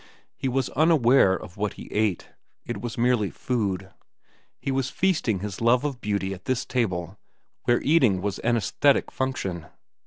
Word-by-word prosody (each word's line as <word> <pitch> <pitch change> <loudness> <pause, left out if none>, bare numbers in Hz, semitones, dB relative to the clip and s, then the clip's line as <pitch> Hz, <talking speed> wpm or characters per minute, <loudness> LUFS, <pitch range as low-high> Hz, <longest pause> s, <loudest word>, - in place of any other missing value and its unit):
He - - -3
was 130 0 0
unaware 135 - +4
of 90 +1 -9
what 105 0 -1
he - - -11
ate. 105 -4 0 0.4
It 120 - -5
was 120 -1 -5
merely 120 -4 +2
food. 100 -6 -2 0.7
He 135 - -3
was 130 -1 0
feasting 155 - 0
his 105 0 -5
love 120 +2 +4
of 140 -4 -3
beauty 100 -2 -1
at 95 -1 -11
this 130 -1 -1
table 95 -7 -2 0.5
where 120 - +2
eating 130 - +4
was 100 +1 -3
an 120 0 +1
aesthetic 140 +5 +2
function. 95 -11 -3
115 Hz, 160 wpm, -25 LUFS, 100-130 Hz, 0.7 s, unaware